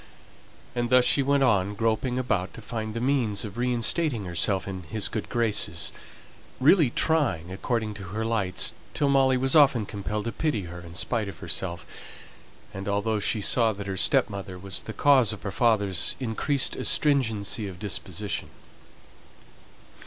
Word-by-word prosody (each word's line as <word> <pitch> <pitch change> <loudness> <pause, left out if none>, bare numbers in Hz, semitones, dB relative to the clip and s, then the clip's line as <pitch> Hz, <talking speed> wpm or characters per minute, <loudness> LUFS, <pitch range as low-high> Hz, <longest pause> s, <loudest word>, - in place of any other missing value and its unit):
And 120 -1 -1
thus 125 0 +5
she 140 - +4
went 140 0 +2
on, 105 -5 +2
groping 115 +3 0
about 105 -8 -1
to - - -9
find 110 0 -5
the - - -2
means 120 -6 0
of 105 -1 -8
reinstating 120 - +1
herself 95 +2 0
in 95 -1 -5
his 95 +6 -1
good 110 - -5
graces 105 -8 0 0.7
really 150 +1 +5
trying, 120 - 0
according 110 +2 -2
to 100 -2 -8
her 105 +5 -4
lights, 105 -5 0 0.2
till 145 -2 +1
Molly 135 -1 +4
was 135 +2 +2
often 135 -7 +5
compelled 105 +1 -4
to 115 - -2
pity 140 -10 -1
her 85 0 -8
in 85 -1 -11
spite 110 +2 0
of 95 -4 -8
herself, 85 -1 -3 0.9
and 95 0 -6
although 105 +2 0
she 105 +1 -1
saw 115 +1 +2
that 100 0 -7
her 95 -1 -3
stepmother 95 0 +1
was 95 0 -5
the - - -7
cause 130 -6 +4
of 105 - -10
her 100 - -3
father's 100 -7 +2
increased 130 +3 -1
astringency 110 -7 +1
of 95 -2 -8
disposition. 100 +2 -4
110 Hz, 160 wpm, -26 LUFS, 100-125 Hz, 0.9 s, thus